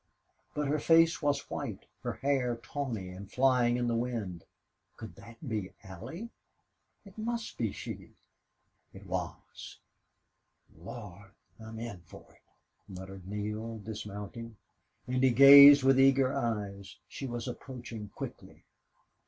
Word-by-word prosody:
But 150 -1 -1
her 150 +2 0
face 165 +2 +4
was 145 -2 0
white, 120 -9 -5 0.2
her 120 -2 -3
hair 135 -3 0
tawny 115 -5 -5
and 95 +2 -10
flying 125 -2 +3
in 120 -1 -1
the 120 - 0
wind. 115 -8 -3 0.5
Could 110 -2 -9
that 115 +3 -13
be 105 -5 -3
Allie? 160 - -8 0.7
It 200 +2 -13
must 230 0 -3
be 115 -4 -1
she. - - -8 0.8
It 100 +1 -12
was. 90 -2 -6 1.0
"Lord! 95 +2 -10 0.3
I'm 110 0 -9
in 115 -6 -7
for - - -13
it!" - - -27 0.5
muttered 95 0 -10
Neale, 105 +2 -4
dismounting, 105 +1 -8 0.5
and 130 0 -1
he 130 - +6
gazed 140 +2 +10
with 135 0 +5
eager 135 -1 +4
eyes. 100 -4 -3
She 135 - -6
was 120 0 -5
approaching 120 -4 -7
quickly. - - -9
115 Hz, 130 wpm, -30 LUFS, 100-135 Hz, 1.0 s, gazed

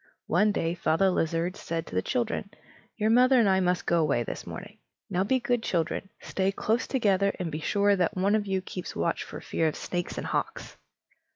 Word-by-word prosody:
One 210 +6 +3
day 165 -4 -1
Father 175 +2 +2
Lizard 165 +2 0
said 165 0 -4
to - - -9
his 95 - +1
children: 125 - -1 0.5
"Your 215 0 +2
mother 255 +2 +6
and 225 - +4
I 190 -1 +4
must 180 -1 +1
go 170 - +2
away 145 -6 +2
this - - -6
morning; - - -8 0.3
now 180 +2 +2
be 260 +6 +2
good 245 -2 0
children; 175 -1 -1
stay 190 0 -1
close 220 +4 0
together, 200 -6 +2
and 175 -3 -3
be 155 - -3
sure 200 +5 +2
that 180 -1 0
one 195 +3 +2
of 210 -1 +1
you 190 -1 -1
keeps 180 -1 -6
watch - - 0
for - - -8
fear 160 - 0
of 155 - -1
snakes 175 -1 -4
and - - -3
hawks!" - - -3
190 Hz, 205 wpm, -28 LUFS, 165-205 Hz, 0.5 s, mother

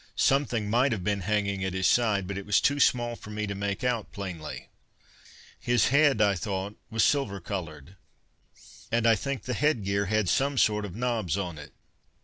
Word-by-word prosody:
Something 125 -6 +1
might 125 +6 +2
have 100 -5 -4
been 100 +1 0
hanging 100 0 -1
at 95 -1 -2
his 95 0 -1
side, 110 -5 +2
but 100 +1 -5
it 100 - -5
was 100 - +4
too 145 0 +1
small 120 -3 +2
for 105 - -12
me 105 0 -3
to 100 - -4
make 100 +2 -3
out 120 -4 -1
plainly. 85 -7 -7 0.9
His 120 -1 +2
head, 140 -5 +4
I 100 -1 +3
thought 95 +2 -4
was 115 -1 +1
silver 135 -9 +1
coloured, 85 -2 -7 0.9
and 115 0 +1
I 115 - +6
think 140 +5 -3
the 125 - -3
headgear 105 -8 +1
had 110 -1 +1
some 140 +7 +1
sort 105 -3 +2
of 95 -3 -8
knobs 115 -7 -1
on 90 -6 -4
it. 75 - -11
105 Hz, 185 wpm, -27 LUFS, 95-120 Hz, 0.9 s, I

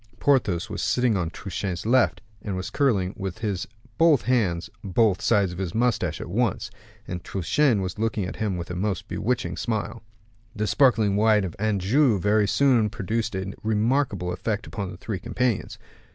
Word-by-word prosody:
Porthos 110 -12 +2
was - - -5
sitting 125 -3 +2
on 90 -4 -1
Truchen's 95 0 -5
left, 125 +2 +3 0.2
and 100 -3 -4
was 95 0 -4
curling 100 -10 +1
with 95 -2 -4 0.6
both 165 -6 +5
his - - -14
hands 95 -9 +1 0.2
both 100 0 +2
sides 100 -5 +2
of 90 - -8
his 95 +1 -3
mustache 115 -9 +1
at - - -6
once, 110 +4 -1 0.4
and 90 -1 -5
Truchen 105 - +1
was 95 +3 -5
looking 110 -3 0
at 90 - -6
him 105 -4 -1
with 85 +1 -6
a - - -4
most 95 0 -2
bewitching 125 +2 -2
smile. 110 0 -3 0.5
The 105 0 -1
sparkling 110 -5 +3
wine 105 -1 +4
of 90 -4 -5
Anjou 110 +4 +2
very 105 +2 +2
soon 120 -3 +3
produced 110 0 -2
a 95 +1 -4
remarkable 110 -4 0
effect 105 +4 -3
upon 100 -3 -5
the 90 - -9
three 100 0 -4
companions. 120 +3 -1
105 Hz, 170 wpm, -25 LUFS, 95-115 Hz, 0.6 s, both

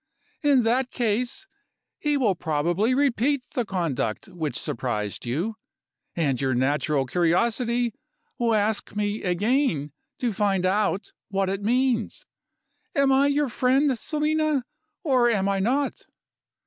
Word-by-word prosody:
In 280 -4 +4
that 245 +3 +1
case, 245 - -1 0.5
he 295 -1 +1
will 230 -8 +2
probably 175 +8 0
repeat 275 0 +1
the 245 - 0
conduct 165 - -2
which 155 -7 -3
surprised 110 -3 -3
you; 175 - -2 0.6
and 140 -7 0
your 130 -2 +1
natural 140 +2 +1
curiosity 230 - +1 0.5
will 230 -2 +2
ask 210 0 0
me 210 +1 -1
again 185 - +1 0.3
to 240 -3 -1
find 195 -2 +1
out 200 +1 0 0.2
what 195 -1 0
it 195 +1 -2
means. 240 +1 0 0.7
Am 275 -1 +3
I 270 +1 +4
your 285 0 +1
friend, 260 +3 +2
Selina, 305 0 0 0.4
or 255 -5 +3
am 200 -4 +1
I 195 0 +1
not? 265 +8 -1
220 Hz, 125 wpm, -25 LUFS, 175-260 Hz, 0.7 s, In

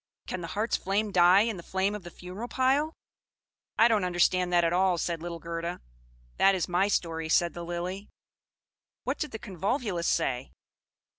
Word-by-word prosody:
Can 185 - -4
the 170 - -5
heart's 210 +8 -1
flame 205 +2 -1
die 180 +1 +6
in 220 -2 -1
the - - -7
flame 190 +3 -1
of 210 - -5
the 175 - -9
funeral 180 +7 -8
pile?" 275 +5 +1 0.8
"I 230 - +7
don't 220 -4 +2
understand 180 0 +2
that 175 -1 +4
at 165 0 +2
all," 185 0 +3
said 165 0 -2
little 170 0 -5
Gerda. 170 +1 -4 0.6
"That 195 0 +5
is 180 - -1
my 180 +3 +2
story," 165 -5 -1
said 170 +1 +3
the 175 - -7
Lily. 180 +4 -5 0.9
What - - -2
did 300 - -2
the 220 - -6
Convolvulus 195 - -2
say? 125 +1 0
180 Hz, 175 wpm, -28 LUFS, 170-205 Hz, 0.9 s, I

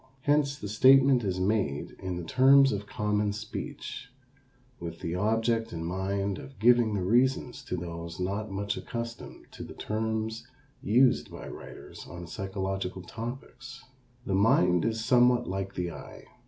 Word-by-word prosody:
Hence 145 0 +2
the 105 - -6
statement 130 +4 +5
is 95 -2 -1
made 95 -8 0
in 95 -1 -4
the 90 - -5
terms 135 +8 +5
of 100 0 -4
common 105 0 0
speech 110 +3 -6 0.7
with 85 -1 -7
the 85 - -3
object 115 +4 0
in 80 -1 -5
mind 95 +2 -2
of 135 - -11
giving 120 -1 +4
the 95 - -1
reasons 125 +4 +1
to 90 - -3
those 85 -1 -6
not 100 +4 -2
much 100 +1 -3
accustomed 115 0 -7
to - - -10
the - - -8
terms 110 +2 -3 0.3
used 125 +4 +3
by - - -9
writers - - -10
on 85 0 -8
psychological 95 0 -4
topics. 120 +6 -8 0.4
The 95 - -2
mind 90 -3 +3
is 110 0 -1
somewhat 125 0 +4
like 95 +1 -4
the 90 -1 -2
eye. - - -11
105 Hz, 150 wpm, -28 LUFS, 95-120 Hz, 0.7 s, statement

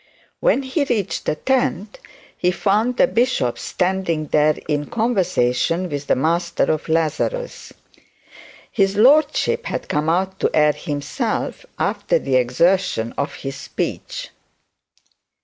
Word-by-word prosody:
When - - +2
he 265 +3 0
reached 225 -8 -2
the - - 0
tent 215 -1 -1 0.4
he 180 - +1
found 210 +7 +1
the - - +6
bishop 230 - 0
standing 180 -4 -1
there 150 0 +3
in 145 -1 -1
conversation 180 - 0
with 145 -1 -5
the - - +3
master 170 +4 0
of 155 +1 -3
Lazarus. 165 - -1 1.0
His 195 -2 +1
lordship 310 - +3
had - - -4
come 150 +2 0
out 190 +3 0
to - - +2
air 150 -1 +5
himself 145 -3 -3
afer - - 0
the 135 -2 -1
exertion 125 -1 +1
of 140 - -3
his 135 -1 -6
speech. - - -5
180 Hz, 125 wpm, -20 LUFS, 150-220 Hz, 1.0 s, the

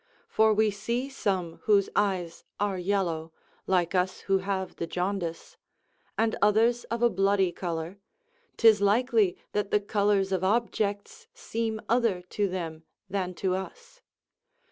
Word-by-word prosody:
for 220 0 +3
we 215 0 +3
see 235 +6 -2
some 185 -10 -2
whose 205 -3 +4
eyes 185 -5 0 0.2
are 205 -1 0
yellow, 175 -4 -1 0.4
like 180 -2 +1
us 185 0 0
who 195 -1 +1
have 190 -1 -3
the 170 - -3
jaundice; 180 -2 -3 0.6
and 220 0 +1
others 225 +4 +3
of 235 +1 -3
a 240 - +6
bloody 195 -1 +2
colour; 170 +1 -5 0.6
'tis 220 -3 +6
likely 215 -2 +3
that 205 -1 -1
the 210 - +3
colours 200 -1 +1
of 190 -1 0
objects 220 - -1
seem 230 - -3
other 230 -6 +1
to 200 +3 -1
them 165 -4 -5 0.3
than 185 -2 -2
to 185 0 -1
us. 475 - -7
200 Hz, 140 wpm, -28 LUFS, 185-220 Hz, 0.6 s, a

